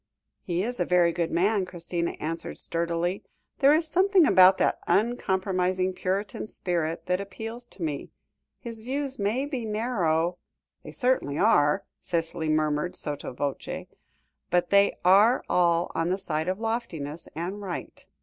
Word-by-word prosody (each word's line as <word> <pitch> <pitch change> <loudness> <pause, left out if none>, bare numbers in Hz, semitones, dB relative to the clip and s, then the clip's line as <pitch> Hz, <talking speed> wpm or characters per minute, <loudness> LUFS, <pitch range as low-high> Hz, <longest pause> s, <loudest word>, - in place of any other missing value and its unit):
"He 175 0 -1
is 245 +1 -4
a - - +3
very 175 -1 +4
good 170 0 -1
man," 195 +3 +2
Christina 170 -1 -3
answered 165 +2 -4
sturdily; 170 +2 -2 0.4
"there 275 0 +6
is 320 +2 +3
something 370 +2 +4
about 185 -6 +7
that - - +1
uncompromising 190 -4 +1
puritan 195 +3 -3
spirit 165 -4 -2
that 180 +1 0
appeals 225 +5 -7
to 180 - -9
me. 150 -3 -3 0.5
His 230 -2 -8
views 270 +2 -3
may 220 +7 0
be 270 -5 -4
narrow 180 -7 0 0.2
" - - -54
"They - - -9
certainly 245 - 0
are," 145 +6 +3 0.2
Cicely 165 -1 -2
murmured 155 +2 0
sotto 145 -2 -4
voce, 140 +2 -4 0.6
"but 180 0 +1
they 200 0 +4
are 205 +7 +5
all 170 -1 +2
on 165 +1 0
the 185 - +1
side 160 -4 -3
of 185 +1 0
loftiness 180 -10 -4
and 180 +6 -4
right." 185 -4 -7
185 Hz, 150 wpm, -27 LUFS, 170-220 Hz, 0.6 s, about